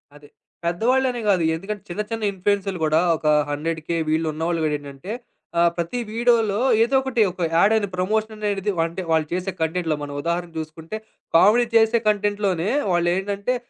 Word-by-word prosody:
అదే. 145 0 -15 0.4
పెద్దవాళ్ళనే 245 +8 +1
గాదు. 185 -4 +3
ఎందుకంటే 200 +4 -6
చిన్న, 175 +4 -2
చిన్న 225 -1 -3
ఇన్‌ఫ్లూయెన్సరులు 195 0 -1
గూడా 155 +1 +3 0.2
ఒక 155 - -3 0.2
100కే 160 +2 -2
వీళ్ళున్నవాళ్ళు 160 +1 0
గూడా 150 -1 +1
ఏంటంటే, 145 +6 -9 0.5
ఆహ్, 170 0 +5
ప్రతి 170 +8 -2
వీడియో‌లో 225 -3 +2 0.2
ఏదో 250 +4 0
ఒకటి 265 -3 0
ఒక 180 -1 -4
యాడ్ 200 +6 +5
అయిన 210 -2 +1
ప్రమోషన్ 215 +4 -1
అనేడిది 205 -1 -1
అంటే 170 +3 -5
వాళ్ళు 160 -1 +2
చేసే 185 +2 -2
కంటెంట్‌లో 160 0 0
మనం 145 0 -6
ఉదాహరణ 170 +2 -2
జూసుకుంటే, 160 +5 -6 0.4
కామెడీ 215 +8 +6
చేసే 225 +1 +5
కంటెంట్‌లోనే 205 -3 +1 0.2
వాళ్ళేంటంటే 195 +7 0
185 Hz, 150 wpm, -22 LUFS, 165-215 Hz, 0.5 s, కామెడీ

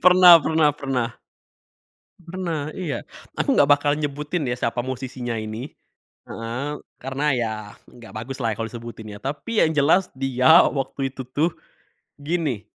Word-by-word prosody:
pernah 180 -2 +9
pernah 155 -1 +2
pernah. 130 -5 -3 1.1
Pernah, 170 -4 -4
iya. 175 -6 -4 0.3
Aku 280 - +1
nggak 145 - +4
bakal 145 0 +4
nyebutin 150 +1 -2
ya 120 - -1
siapa 115 0 -1
musisinya 125 -1 -4
ini 110 +4 -5 0.6
heeh, 120 +5 -4 0.3
karena 135 +2 -3
ya, 115 -2 -1 0.3
nggak 120 -2 -14
bagus 125 +5 -6
lah 115 - +1
kalo 115 - -3
disebutin 115 -2 -9
ya. - - -10
Tapi 150 +11 -2
yang 160 - +1
jelas 165 +6 +4
dia, 135 +4 +5
waktu 135 -1 -2
itu 135 - -6
tuh 155 +6 0 0.7
gini, 145 - -2
135 Hz, 140 wpm, -23 LUFS, 120-155 Hz, 1.1 s, pernah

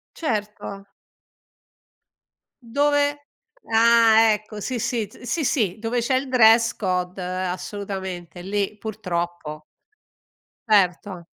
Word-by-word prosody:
Certo. 210 -7 -4 1.8
Dove 290 +3 +1 0.5
ah, 225 -1 +6
ecco! 215 0 -4
Sì, 250 +3 -3
sì 225 0 -1
t 205 - -18
sì, 250 +7 -2
sì 220 - 0
dove 230 +2 -1
c'è 240 +3 0
il 260 +1 -1
dress 230 -2 +5
code, 180 -1 -2 0.2
assolutamente, 185 -2 -5
lì 200 +2 -2
purtroppo. 175 -7 -4 1.1
Certo. 185 -3 +1
215 Hz, 95 wpm, -23 LUFS, 185-235 Hz, 1.8 s, ah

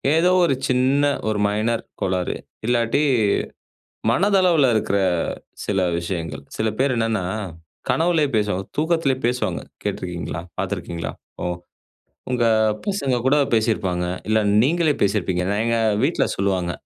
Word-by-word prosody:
ஏதோ, 170 +3 +4 0.2
ஒரு 135 -5 +2
சின்ன 130 +3 +2 0.3
ஒரு 105 - -1
மைனர் 110 +3 0 0.2
கோளாறு. 90 -1 0 0.3
இல்லாட்டி 120 +3 +2 1.1
மனதளவுல 180 - +4
இருக்குற 100 -2 +1 0.7
சில 100 -2 0 0.2
விஷயங்கள். 85 -2 -4
சில 110 0 0
பேர் 135 0 +2
என்னன்னா, 115 -4 0 0.7
கனவிலயே 165 -3 +2
பேசுவாங்க, 105 -3 0
தூக்கத்துலயெ 155 -5 +1
பேசுவாங்க. 125 +1 -1 0.2
கேட்ருக்கீங்களா? 85 -3 -4 0.2
பாத்துருக்கீங்களா? 90 -5 -3 0.3
ஓ - - 0 0.9
உங்க 120 -2 +1 0.4
பசங்க 190 -11 0
கூட 135 +2 +4 0.2
பேசிருப்பாங்க. 105 -6 +1 0.2
இல்ல, 110 0 +3 0.2
நீங்களே 160 +1 +2
பேசிருப்பீங்க. 95 -3 +1 0.2
எங்க 115 0 +1 0.3
வீட்ல - - +2
சொல்லுவாங்க, 95 -3 0
115 Hz, 110 wpm, -22 LUFS, 95-140 Hz, 1.1 s, ஏதோ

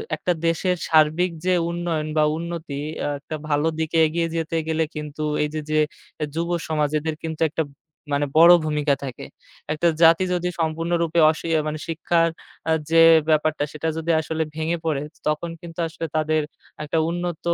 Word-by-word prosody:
একটা 180 - 0
দেশের 180 +2 +1
সার্বিক 160 +3 +3
যে 185 - +3 0.2
উন্নয়ন 170 -3 -2
বা 155 - +5
উন্নতি, 165 -4 -5 0.2
অ্যা - - -1
একটা 155 - -6
ভালো 145 +2 +2
দিকে 160 +1 -1
এগিয়ে 165 +2 -1
যেতে 165 0 -2
গেলে 160 0 +1
কিন্তু 150 0 -5 0.2
এই 150 - -1
যে, 155 - -2
যে 155 0 +2 0.4
এ - - +1
যুব 170 +1 -1 0.2
সমাজ 150 -2 +1
এদের 155 +1 -3
কিন্তু 160 -1 -5
একটা 160 +2 -1 0.5
মানে 145 +1 +2
বড় 170 +2 +9
ভূমিকা 150 -1 +1
থাকে। 130 -3 -6 0.5
একটা 170 +3 +1 0.2
জাতি 165 +3 +6
যদি 180 0 -1
সম্পূর্ণরূপে 165 +1 0
অশি 160 - -7
আ - - +2
মানে 155 0 -3
শিক্ষার 165 +1 +1 0.4
অ্যা 160 - +2 0.2
যে 165 0 +6 0.3
ব্যাপারটা 155 -1 +2
সেটা 155 +1 -4
যদি 165 +1 -1
আসলে 160 0 -2
ভেঙে 160 +2 -1
পড়ে, 150 -3 0 0.2
তখন 150 +3 -1
কিন্তু 170 -1 -10
আসলে 165 0 -6
তাদের 155 0 +2 0.4
একটা 150 +2 -2
উন্নত 175 -1 -3
160 Hz, 170 wpm, -23 LUFS, 155-170 Hz, 0.5 s, বড়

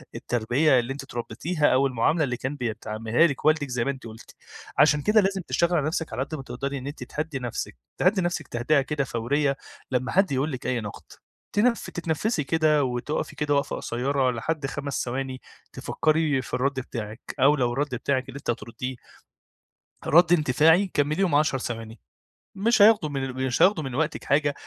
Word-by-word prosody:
التربية 125 +4 +2
اللي 120 +3 -3
أنتِ 140 - -7
اتربتيها 145 +5 -2
أو 135 +2 +4
المعاملة 135 +6 +1
اللي 125 -3 -2
كان 130 +3 -4
بيتعاملها 115 +2 0
لِك 140 -3 -5
والدِك 155 -2 +3
زي 125 -1 -1
ما 140 - +1
أنتِ 135 -3 -9
قلتِ، 115 +1 -13 0.4
عشان 150 0 +5
كده 210 +7 +4
لازم 195 0 0
تشتغلي 170 0 +2
على 145 - 0
نفسِك 160 0 -3
على 130 - -1
قد 150 +3 -6
ما 135 - -7
تقدري 140 +2 -4
إن 130 +1 -7
أنتِ 145 - -6
تهدِّي 150 -2 -4
نفسِك 120 - -4 0.2
تهدِّي 190 +2 +3
نفسِك 175 0 -2
تهدئة 135 +5 +1
كده 140 0 -2
فورية 135 +4 0 0.3
لمّا 130 0 0
حد 195 -3 +3
يقول 140 +4 0
لِك 130 -2 -5
أي 125 -3 0
نقد، 105 -1 -8 0.5
تتنف 230 +3 +1
تتنفسي 165 +1 -1
كده 155 -1 +2
وتُقفي 125 +3 -3
كده 145 -1 0
وقفة 140 -1 0
قصيرة 130 +2 0
لحد 145 +5 -3
5 140 0 -3
ثواني 130 +1 -4 0.3
تفكري 155 -3 +1
في - - -12
الرد 135 +1 0
بتاعِك 110 -2 -6 0.2
أو 145 +3 +5
لو 125 -3 0
الرد 140 0 -1
بتاعِك 130 +1 -1
اللي - - -8
أنتِ 140 - -7
هترديه 120 +3 -4 1.1
رد 175 +2 +6
اندفاعي 165 +5 +4
كمليهم 155 +4 +1
10 150 -2 +3
ثواني 115 -2 -6 0.6
مش 220 +2 +2
هياخدوا 205 -7 +6
من 135 -2 -3
مش 125 -1 -1
هياخدوا 185 -5 +4
من 130 -3 -5
وقتِك 155 +2 -1
حاجة 145 0 +2
140 Hz, 180 wpm, -25 LUFS, 125-155 Hz, 1.1 s, رد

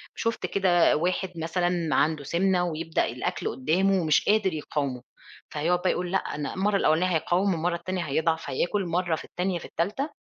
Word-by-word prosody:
شُفت 230 0 -2
كده 180 -3 +3
واحد 180 +3 -1
مثلًا 170 0 -1
عنده 150 0 +1
سِمنة 180 +4 +1
ويبدأ 165 -1 -1
الأكل 120 +2 -3
قدامه 180 +9 +1
ومش 155 -3 +2
قادر 210 -4 +3
يقاومه 140 -4 -3 0.5
فهيقعد 165 +4 +1
بقى 185 - +1
يقول 180 0 -3
لأ 190 - +3
أنا 145 -4 -5
المرّة 200 +2 +1
الأولانية 175 -1 +3
هيقاوم 185 +4 +1
والمرّة 170 +1 -1
التانية 180 +1 -3
هيضعف 160 +2 0
هياكل 190 +8 0
مرّة 175 0 0
في - - -8
التانية 180 0 -2
في - - -10
التالتة 210 - -2
175 Hz, 170 wpm, -26 LUFS, 160-185 Hz, 0.5 s, كده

